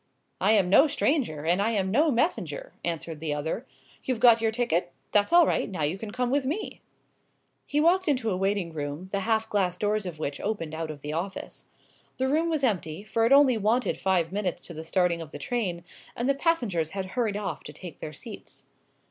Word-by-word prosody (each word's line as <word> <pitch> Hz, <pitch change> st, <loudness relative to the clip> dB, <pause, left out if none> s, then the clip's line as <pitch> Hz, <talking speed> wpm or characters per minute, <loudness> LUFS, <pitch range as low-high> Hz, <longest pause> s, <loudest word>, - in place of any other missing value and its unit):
"I 215 Hz, -, +4 dB
am 200 Hz, -4 st, +4 dB
no 235 Hz, -, +6 dB
stranger, 270 Hz, -, 0 dB
and 175 Hz, +4 st, +3 dB
I 215 Hz, -, +2 dB
am 190 Hz, -3 st, 0 dB
no 300 Hz, +9 st, +4 dB
messenger!" 345 Hz, -, -1 dB
answered 165 Hz, -2 st, -3 dB
the 150 Hz, -2 st, -2 dB
other. 160 Hz, -, -3 dB, 0.4 s
"You've 255 Hz, -3 st, -1 dB
got 230 Hz, -2 st, +6 dB
your 225 Hz, -, +2 dB
ticket? 200 Hz, -7 st, 0 dB, 0.2 s
That's 205 Hz, +5 st, +3 dB
all 345 Hz, -1 st, +7 dB
right! -, -, 0 dB
Now 180 Hz, -6 st, -3 dB
you 150 Hz, +4 st, +1 dB
can 220 Hz, -, -6 dB
come 250 Hz, +3 st, -1 dB
with 285 Hz, 0 st, +2 dB
me." 305 Hz, +11 st, -4 dB, 0.9 s
He 295 Hz, -, +1 dB
walked 350 Hz, +4 st, +3 dB
into 255 Hz, -7 st, +1 dB
a -, -, 0 dB
waiting 195 Hz, -2 st, -1 dB
room, 150 Hz, +4 st, -5 dB
the 200 Hz, -, 0 dB
half 220 Hz, +2 st, +1 dB
glass 185 Hz, -4 st, 0 dB
doors 210 Hz, 0 st, 0 dB
of 170 Hz, -3 st, -6 dB
which 140 Hz, -2 st, -4 dB
opened 195 Hz, -7 st, -3 dB
out 160 Hz, 0 st, -4 dB
of 150 Hz, -2 st, -7 dB
the 150 Hz, +2 st, -4 dB
office. 180 Hz, +5 st, -5 dB, 0.5 s
The 260 Hz, -, +1 dB
room 315 Hz, +5 st, +2 dB
was 310 Hz, -4 st, -1 dB
empty, 185 Hz, -7 st, -1 dB
for 225 Hz, +1 st, +1 dB
it -, -, -1 dB
only 275 Hz, -4 st, +6 dB
wanted 225 Hz, +5 st, +1 dB
five 180 Hz, -3 st, +1 dB
minutes 185 Hz, -3 st, -2 dB
to 170 Hz, -, -9 dB
the 160 Hz, 0 st, -7 dB
starting 170 Hz, 0 st, +1 dB
of 160 Hz, -, -8 dB
the -, -, -8 dB
train, 190 Hz, -9 st, -2 dB, 0.3 s
and 240 Hz, -, -1 dB
the 275 Hz, -, +4 dB
passengers 240 Hz, -, 0 dB
had 190 Hz, -, -1 dB
hurried 215 Hz, +1 st, -1 dB
off 210 Hz, -2 st, -4 dB
to -, -, -7 dB
take 180 Hz, -3 st, -10 dB
their 150 Hz, -, -6 dB
seats. 145 Hz, -, -10 dB
205 Hz, 215 wpm, -27 LUFS, 170-250 Hz, 0.9 s, all